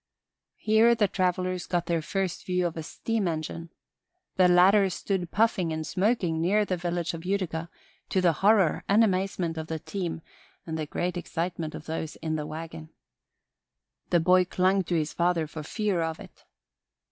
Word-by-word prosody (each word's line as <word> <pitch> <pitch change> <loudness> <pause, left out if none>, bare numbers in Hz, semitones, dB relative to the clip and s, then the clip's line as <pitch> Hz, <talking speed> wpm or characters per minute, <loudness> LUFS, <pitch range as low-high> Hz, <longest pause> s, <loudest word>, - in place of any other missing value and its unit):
Here 220 +2 +4
the 210 -3 +3
travelers 185 -1 -1
got 175 -1 0
their 170 -1 0
first 190 +2 -2
view 180 -1 +1
of 170 - -2
a 160 - -4
steam 215 +5 -2
engine. 165 +1 -4 0.7
The 185 -1 +5
latter 190 +3 +5
stood 180 -1 -2
puffing 195 -5 +1
and 160 0 -3
smoking 185 -5 0
near 205 +5 +2
the 185 - -1
village 175 -1 -2
of 165 -1 -7
Utica, 180 -4 -2 0.4
to 190 - +1
the 175 -2 +3
horror 195 -4 +4
and 210 +3 +6
amazement 185 -4 0
of 160 - -5
the 160 - -3
team 170 0 -5 0.4
and 160 - -4
the 155 -1 -3
great 180 +4 -2
excitement 170 -2 -3
of - - -9
those 160 -1 -4
in 160 -1 -3
the 150 -1 -3
wagon. 155 - -7 1.2
The 175 - +4
boy 180 +2 +5
clung 185 +2 +2
to 175 - -1
his 155 -2 -1
father 170 -2 +1
for 155 +1 -7
fear 200 +3 -1
of 160 -1 -2
it. - - -14
175 Hz, 170 wpm, -27 LUFS, 160-190 Hz, 1.2 s, and